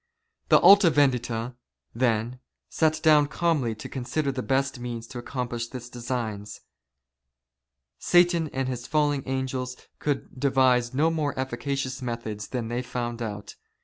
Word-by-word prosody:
^ - - -39
The - - +8
Alta 195 0 +8
Vendita, 125 -5 +1 0.4
then, 120 0 0 0.3
sat 155 -1 +1
down 150 -2 +6
calmly 140 -6 0
to 105 - -8
consider 140 +3 -2
the 130 -1 -3
best 135 0 0
means 120 -1 -5
to 120 +1 -8
accomplish 120 -2 -4
this 125 -1 -9
design. 115 -4 -4 1.5
Satan 175 -2 +3
and 135 0 -2
his 125 -1 -4
fallen 145 -2 +1
angels 130 -1 -3 0.2
could 140 -3 -3
devise 130 -2 +3
no 160 +4 +3
more 150 -4 -2
efficacious 130 0 -3
methods 115 -4 -4
than 120 -3 -3
they 120 +2 -2
found 120 -1 -4
out. 105 -3 -6
130 Hz, 140 wpm, -26 LUFS, 120-145 Hz, 1.5 s, The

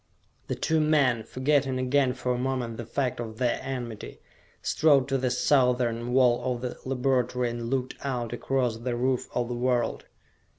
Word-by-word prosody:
The - - -2
two 160 0 +1
men, 145 -6 +3
forgetting 130 +3 0
again 130 0 +2
for 125 -1 -2
a - - -2
moment 125 -3 -2
the 120 -1 -6
fact 130 -1 -1
of 110 -2 -6
their 125 -1 +1
enmity, 120 - -6 0.4
strode 145 -4 +3
to 135 0 +1
the 130 0 0
southern 125 -3 +2
wall 125 0 +3
of 120 - -8
the 125 -1 -4
laboratory 125 -2 0
and 120 0 -5
looked 130 -1 -1
out 125 -4 -2
across 125 -2 0
the 120 +1 -3
roof 125 +1 0
of 120 -1 0
the 120 - -3
world. 120 0 0
125 Hz, 170 wpm, -27 LUFS, 120-130 Hz, 0.4 s, men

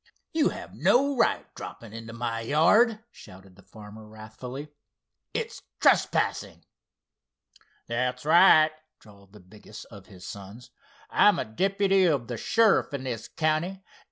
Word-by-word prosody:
"You 315 -2 +2
have - - -9
no 280 +3 +2
right 240 - +1
dropping 115 -2 -10
into 115 0 -9
my 115 0 -4
yard!" 210 - +3
shouted 95 - -15
the 100 - -18
farmer, 105 +1 -13
wrathfully. 115 +6 -9 0.6
"It's - - -5 0.2
trespassing." - - +1 1.2
"That's 125 +2 -3
right," 155 -1 +6 0.3
drawled 100 -2 -19
the 105 - -14
biggest 105 +3 -13
of 100 -3 -13
his 90 -3 -14
sons. 100 +5 -10 0.4
"I'm - - +4
a - - -2
deputy 195 - +1
of 140 -9 0
the 120 - -4
sheriff 220 - +2
in 135 - -6
this 120 -4 -5
county. 165 +5 -2
125 Hz, 130 wpm, -26 LUFS, 110-175 Hz, 1.2 s, right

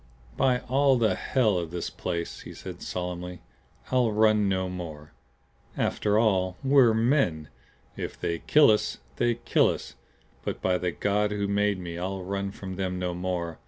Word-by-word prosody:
"By 125 -2 +2
all 135 0 +3
the 115 -2 +3
HELL 110 -8 +1
of 85 -2 -4
this 85 +1 -4
place," 85 -2 -4
he - - -10
said, - - -8
solemnly, 90 -1 -5 0.5
"I'll 125 -3 +3
run 105 -1 +3
no 95 -1 0
more. 80 -5 -7 0.7
After 105 0 +1
all 95 -5 +2
we're 135 -4 +5
men. 110 - +1 0.5
If - - -6
they 85 -1 -2
kill 150 -6 +5
us, 105 - 0 0.2
they 120 -1 +2
kill 120 - +2
us. - - -5 0.5
But - - -3
by 90 -1 +1
the 90 - 0
God 105 +3 0
who 100 -1 -1
made 100 0 +1
me 85 -2 -6
I'll 95 +1 -3
run 100 +1 -2
from 95 -1 -7
them 95 -1 -2
no 90 -1 -2
more. 90 -2 -3
95 Hz, 165 wpm, -27 LUFS, 90-110 Hz, 0.7 s, we're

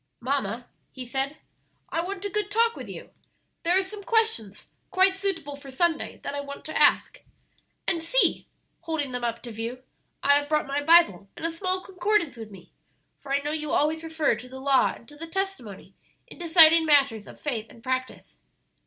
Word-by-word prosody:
"Mamma," 255 -2 -2 0.3
he 255 -1 -7
said, 270 +4 -1 0.5
"I 330 - -1
want 390 +2 -5
a - - -1
good 420 +1 -1
talk 460 +2 +2
with - - -8
you; - - -9 0.5
there 350 +2 +3
are 385 - +3
some 405 +2 -8
questions, 445 - 0 0.2
quite 380 0 +4
suitable 380 -7 -3
for 280 -1 -12
Sunday, 320 +4 -1
that 280 - -4
I 285 - -3
want 280 0 -9
to 315 - -7
ask. - - +3 0.7
And 335 - +1
see," - - +2 0.3
holding 320 -5 -3
them 250 -1 -4
up 230 -1 -2
to 240 - -7
view, 230 +3 -6 0.4
"I 285 +1 +6
have 290 0 -7
brought 305 0 +1
my 280 +1 -1
Bible 285 - +5
and - - -5
a 330 - 0
small 370 +2 -2
concordance 370 -4 0
with 225 -2 -9
me, 190 -4 -14 0.5
for 275 - -10
I 280 +1 +2
know 295 +1 -3
you 305 -1 -3
always 310 +3 +1
refer 320 -3 +1
to 250 - -11
the 265 +1 -9
Law 270 -1 +3
and 230 - -17
to 295 - -13
the 330 +3 -7
Testimony 385 - -4 0.3
in - - -14
deciding 325 -1 +6
matters 270 -8 +3
of - - -13
faith 230 -7 -3
and 230 - -17
practice." 255 0 -4
295 Hz, 195 wpm, -26 LUFS, 260-350 Hz, 0.7 s, I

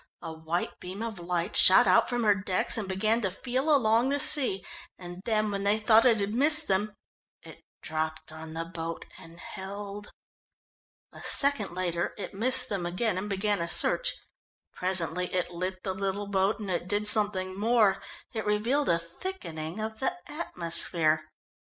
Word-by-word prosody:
A 160 - -6
white 160 +2 -4
beam 190 +4 -7
of 220 -5 -6
light 175 +2 -3
shot - - +7
out - - +3
from 245 -1 -1
her 210 -1 +4
decks, 190 -2 -1
and 210 -4 -3
began 215 +5 0
to 195 - 0
feel 255 - -3
along 240 -3 +3
the 285 +1 -1
sea. 250 -10 +2 0.3
And 175 0 -10
then 215 -2 0
when 200 -1 -3
they 205 +1 +2
thought 220 +1 +4
it 230 -4 +4
had 200 +1 -2
missed 300 +5 +2
them, 205 +2 -1 0.5
it - - -13 0.2
dropped 155 0 -4
on 160 0 -10
the 165 0 -4
boat 165 -1 -7
and 165 +1 -15
held. 200 +2 -8 1.0
A - - -12
second 260 -11 +3
later 175 -2 -2
it 205 - -7
missed 255 +5 +2
them 190 -6 -3
and 185 +2 -2
began 200 0 -1
a 170 - -2
search. - - +4 0.6
Presently 180 -1 0
it 180 -1 -2
lit 185 +2 -5
the 190 - -3
little 195 +1 -3
boat, 200 +2 0
and 200 -3 -5
it 175 0 -3
did 205 +2 +1
something 205 -3 +4
more 215 -3 +2 0.3
it 220 -2 -3
revealed 230 +8 0
a 170 - +3
thickening 170 - -7
of 220 0 -5
the 355 +7 -2
atmosphere. 165 - -1
200 Hz, 170 wpm, -27 LUFS, 175-220 Hz, 1.0 s, shot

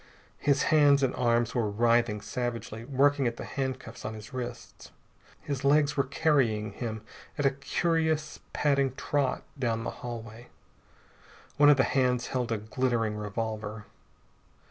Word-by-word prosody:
His 140 -1 +2
hands 145 -2 +5
and 130 - +2
arms 120 -1 +1
were 115 -4 0
writhing 115 0 +2
savagely, 115 -2 -4
working 140 0 +2
at 120 0 -3
the - - -6
handcuffs 130 -4 -4
on 110 0 -4
his 110 +5 -11
wrists. 125 -2 -7 0.5
His 140 -2 -4
legs 145 +1 +3
were 140 - +2
carrying 130 -8 +1
him 110 0 -5 0.3
at 145 - 0
a 135 - +5
curious, 155 +2 -1
padding 140 -3 +1
trot 140 -1 -1 0.2
down 115 -3 0
the - - -3
hallway. 115 -1 -7 1.1
One 145 0 +7
of 145 - +6
the 130 - +4
hands 125 -2 +1
held 125 -2 -2
a 115 - +1
glittering 115 0 -1
revolver. 110 0 -4
125 Hz, 145 wpm, -28 LUFS, 115-140 Hz, 1.1 s, One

